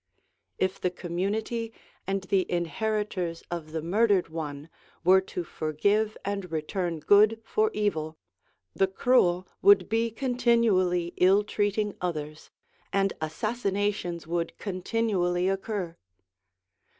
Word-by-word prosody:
If 185 0 -1
the 180 - +1
community 200 +6 -3 0.4
and 195 0 -1
the 190 0 0
inheritors 180 0 -2
of 165 -3 -5
the 160 -1 -3
murdered 200 +1 +2
one 150 -2 -5 0.4
were 190 +2 +6
to 180 -2 -5
forgive 200 +8 0
and 200 -3 -3
return 165 +1 -2
good 210 +6 +5
for 435 - +1
evil, 160 -7 -1 0.6
the 195 - +2
cruel 190 -3 +2
would 200 -2 +6
be 225 +1 +1
continually 225 -8 +2
ill 195 +3 +5
treating 205 0 -1
others, 155 -3 -4 0.4
and 195 0 +1
assassinations 200 -1 -2
would 170 +1 -2
continually 185 -2 0
occur. 195 -3 -2
190 Hz, 110 wpm, -27 LUFS, 175-210 Hz, 0.6 s, were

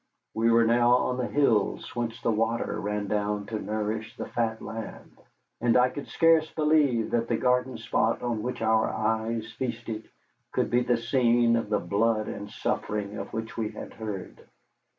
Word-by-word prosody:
We 115 +1 +2
were 115 0 +5
now 120 +1 +5
on 125 0 0
the 125 - -1
hills 120 -8 +1
whence 120 -1 -3
the - - +2
water 115 +1 0
ran 105 0 -2
down 105 0 -1
to 110 0 -4
nourish 110 +1 -3
the - - -4
fat 115 -2 -1
land, 110 0 -8 0.4
and 120 0 +3
I 125 0 +5
could 145 - -7
scarce 165 -1 +4
believe 150 -7 +2
that 115 -1 +1
the 115 - +1
garden 125 0 +1
spot 115 +2 0
on 120 -3 -1
which 125 0 -3
our 110 0 +3
eyes 110 +1 -1
feasted 115 -3 -5 0.4
could - - 0
be 120 +1 +4
the 120 -1 +2
scene 120 -1 +3
of 115 -2 -1
the 105 - +2
blood 110 +4 +1
and 100 0 -6
suffering 105 0 -3
of - - -6
which 110 0 -5
we 110 -2 -2
had - - -9
heard. 105 -4 -6
115 Hz, 175 wpm, -27 LUFS, 110-120 Hz, 0.4 s, were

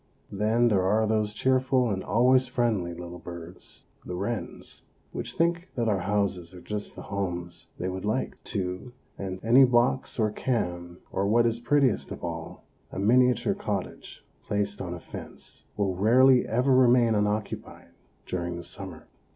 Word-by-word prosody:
Then 110 +4 +2
there 100 -4 +3
are 105 +4 +2
those 110 -1 +1
cheerful 130 +1 +2
and 95 -1 -2
always 125 +3 +4
friendly 110 -9 0
little 90 0 -8
birds, 85 0 -10 0.2
the 90 - -5
wrens, 100 +5 -4 0.3
which - - -4
think 170 +2 0
that 120 -2 0
our 100 -3 +2
houses 95 -2 -1
are - - -9
just 105 +3 -5
the - - -8
homes 90 -3 -4
they 90 - -3
would 95 0 -4
like, 110 +5 -2
too; 95 +4 -4 0.3
and 95 -1 -4
any 120 +5 +7
box 125 +1 +2
or 110 -3 +2
can, 90 -8 -2
or 100 +1 0
what 115 +3 +4
is 115 0 +1
prettiest 130 -1 +2
of - - -7
all, 85 -1 -6 0.3
a - - -7
miniature 125 +4 +3
cottage - - -5 0.2
placed 100 -1 -1
on 90 -2 -4
a - - -8
fence, - - -9
will 100 -2 +1
rarely 125 +7 +5
ever 125 +4 +2
remain 125 -2 +5
unoccupied 105 0 -2 0.4
during 85 -1 -3
the 85 - -7
summer. 95 -2 -8
105 Hz, 160 wpm, -27 LUFS, 90-120 Hz, 0.4 s, any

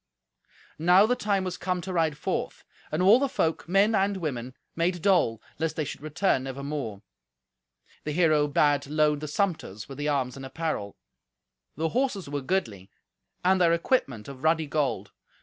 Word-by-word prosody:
Now 180 +5 +6
the 250 +3 +2
time 205 -5 0
was 180 -1 -4
come 180 0 -1
to 185 +1 -5
ride 160 -3 +1
forth, - - -3 0.3
and 155 +4 0
all 210 +6 +7
the 280 0 0
folk, 165 -7 -1
men 200 +4 +4
and 200 -1 +1
women, 130 -7 -4 0.2
made 175 +1 0
dole, 175 - +3 0.2
lest 160 0 -1
they 155 - -1
should 140 - -7
return 155 -2 0
never 135 +1 -6
more. 135 -8 -4 1.0
The 150 - -3
hero 155 -2 +3
bade 145 0 +2
load 150 0 +2
the 155 - -5
sumpters 155 - -2
with 135 0 -9
the 145 - -1
arms 130 -3 -1
and 135 - -9
apparel. 135 -7 -4 0.8
The 160 +2 -1
horses 240 - -1
were 145 0 -3
goodly, 115 - -2 0.6
and 185 0 +4
their 170 -1 +5
equipment 155 - 0
of 135 -2 -9
ruddy 160 0 +2
gold. 145 -1 -1
155 Hz, 170 wpm, -27 LUFS, 140-185 Hz, 1.0 s, all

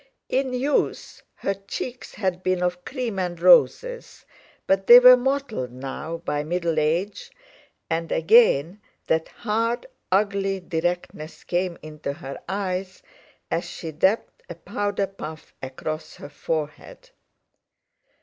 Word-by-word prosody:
In 265 0 0
youth 270 +4 -1
her 195 - -1
cheeks 220 +6 -7
had 185 -3 -2
been 185 -1 0
of 180 0 -1
cream 245 -7 -3
and 175 -2 -3
roses, - - +3 0.4
but 195 0 +1
they 240 - +12
were 250 0 +10
mottled 250 - -2
now 135 +6 -6
by 150 -3 -2
middle 170 0 -1
age, 170 +7 -1 0.6
and 165 +1 -2
again 175 - +4 0.2
that 160 0 +1
hard, 230 - -2 0.3
ugly 195 0 +1
directness 175 -2 -4
came 175 0 -1
into 150 -2 -5
her 140 -3 -8
eyes 190 -1 -3 0.5
as 170 - 0
she 165 -2 -6
dabbed 190 +8 0
a 170 - -6
powder 205 +2 -2
puff 160 -5 -9
across 155 +4 -6
her - - -10
forehead. 155 - -5
185 Hz, 120 wpm, -24 LUFS, 160-220 Hz, 0.6 s, they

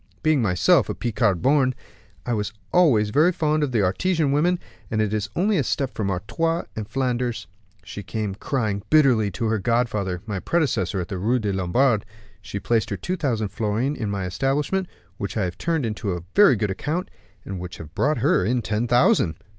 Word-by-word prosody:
Being 155 -4 +3
myself 90 -5 +3
a - - -2
Picard 110 -6 0
born, 130 -2 +3 0.5
I 120 - -1
was 105 -1 -2 0.2
always 120 -13 +4
very 155 +8 +4
fond 155 -2 0
of 145 -3 0
the 110 -4 +2
Artesian 155 - +1
women, 170 +6 +2 0.3
and 110 - -1
it 110 -1 0
is 105 -1 -1
only 200 +3 +2
a 145 - +2
step 130 +1 -1
from 100 -3 -2
Artois 165 - -1
to 110 - -4
Flanders; 125 -1 -2 0.4
she 95 +3 -7
came 105 +1 -3
crying 105 -2 -2
bitterly 130 -9 +4
to 100 +4 -4
her 110 -1 +1
godfather, 105 -5 -1
my 105 -4 -3
predecessor 110 - 0
in - - -3
the 95 -3 -5
Rue 115 +7 +2
des 105 -4 -1
Lombards; 105 +5 +2 0.4
she 100 -1 -5
placed 115 0 0
her 100 - -3
two 180 - -3
thousand 115 - -1
florins 115 +7 -1
in 110 -3 -2
my 100 -2 -2
establishment, 140 - -1 0.3
which 100 - -4
I 105 - +1
have 90 -1 -4
turned 150 -10 -1
to 90 -5 -4
very 205 -11 +6
good 105 -2 -1
account, 160 - -3 0.3
and 95 -2 -5
which 90 0 -7
have 75 -1 -10
brought 150 - +1
her 120 - +2
in 120 +4 0
ten 110 +3 -1
thousand." 120 -9 +3
115 Hz, 195 wpm, -23 LUFS, 100-140 Hz, 0.5 s, very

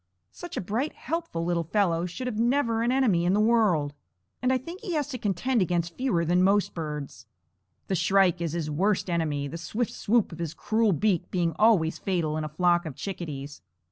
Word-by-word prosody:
Such 350 - -8
a - - 0
bright, 225 - -2
helpful 325 - -3
little 170 -1 0
fellow 175 -2 +1
should 215 +9 -6
have 220 -4 -3
never 235 -1 +2
an 240 +1 +1
enemy 240 -10 +3
in 180 +2 +2
the - - +2
world; 210 -10 +3 0.5
and 255 +1 +2
I 260 - +3
think 335 +9 -9
he 390 -6 -4
has 295 -3 0
to 255 -4 -5
contend 215 +5 0
against 170 -2 -1
fewer 215 -11 0
than 175 +2 +3
most 200 +2 +3
birds. 150 -4 -6 0.6
The - - -3
shrike 180 -1 +3
is 165 -2 -2
his 160 -3 -2
worst 185 +4 +1
enemy, 150 -4 -1
the 165 +4 -7
swift 220 +7 -2
swoop 225 -1 +1
of 165 - -9
his 165 -1 -4
cruel 220 +2 +1
beak 190 0 +1
being 170 -3 0
always 200 -8 +4
fatal 170 -5 -1
in 155 - -2
a 155 - -4
flock 175 +2 +2
of 145 - -7
chickadees. 145 -7 -6
180 Hz, 205 wpm, -27 LUFS, 165-230 Hz, 0.6 s, always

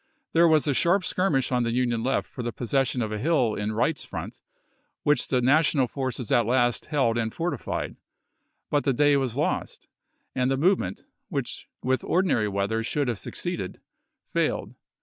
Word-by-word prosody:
There 170 +1 +6
was 155 -2 +4
a 145 - +2
sharp 180 +7 +3
skirmish 170 -9 +1
on 125 -1 +2
the 115 -1 0
Union 120 -2 +1
left 130 +3 0
for 125 - -7
the 120 0 -2
possession 125 +1 0
of 110 - -3
a 105 - -3
hill 130 -4 +2
in 105 +1 -2
Wright's 145 +8 0
front, - - -7 0.6
which 145 -3 +2
the 125 -2 +1
National 140 0 +4
forces 130 -2 -4
at 120 -2 +3
last 120 -1 +1
held 130 -7 +1
and 110 -1 -1
fortified. 165 -3 -3 0.7
But 145 -1 +2
the 135 - +2
day 145 +3 +4
was 130 -3 -1
lost, 150 - -2 0.5
and 125 0 +1
the 135 - +1
movement, 160 - +1 0.2
which - - -4 0.2
with 130 0 +1
ordinary 175 - +2
weather 100 +3 -1
should 135 +3 -1
have 115 -4 -2
succeeded, - - -4 0.5
failed. - - 0
130 Hz, 170 wpm, -26 LUFS, 120-150 Hz, 0.7 s, There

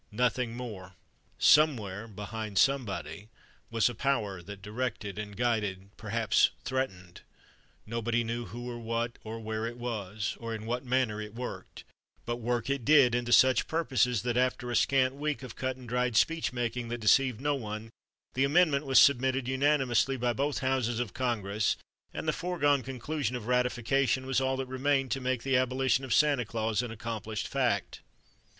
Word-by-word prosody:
Nothing 120 +1 0
more. 100 -7 -8 0.4
Somewhere, 115 -9 +3
behind 105 0 -6
Somebody, 105 - 0 0.4
was 115 -1 +2
a 120 - -2
Power 110 -7 -1
that 100 +2 -10
directed 105 -2 -4
and 105 -2 -7
guided—perhaps 105 -4 +1 0.2
threatened. 110 -9 -3 0.6
Nobody 115 +1 -1
knew 115 +1 -3
who 120 +2 -7
or 120 -1 -5
what 115 +1 -3
or 115 +1 -6
where 110 0 -3
it 120 +1 -7
was 110 -4 -4
or 115 -1 -4
in 110 0 -7
what 120 +3 -2
manner 125 -4 0
it 105 0 -8
worked, 125 +1 -7 0.4
but 120 0 -2
work 120 0 -2
it 140 -2 -1
did 135 -3 +6
and 120 0 0
to - - -2
such 130 +1 +5
purposes 125 - +1
that, 120 -1 -1
after 125 -1 0
a - - -1
scant 130 0 +3
week 145 0 -3
of 125 -3 -8
cut 130 0 -2
and 125 -1 -12
dried 125 -1 0
speech 165 -1 +2
making 120 -1 -3
that 120 - -2
deceived 120 +2 +3
no 145 +2 +1
one, 110 -3 -5 0.4
the 135 - +1
Amendment 150 -1 +3
was 135 - +3
submitted 130 -1 +4
unanimously 135 -1 +2
by 120 -1 0
both 140 +3 -1
houses 125 -3 0
of 120 -5 -3
Congress 105 -5 0 0.3
and - - -6
the - - +2
foregone 145 -6 +1
conclusion 135 0 -3
of 120 -3 -5
ratification 125 +1 +1
was 135 0 +1
all 130 0 0
that 135 - -2
remained 135 +1 0
to 135 - -1
make 130 -2 -1
the 135 -1 +2
abolition 130 0 +1
of 130 - -6
Santa 140 +1 +4
Claus 110 -1 -1
an 125 - -5
accomplished 110 0 -4
fact. 120 -10 -1
120 Hz, 170 wpm, -29 LUFS, 110-130 Hz, 0.6 s, did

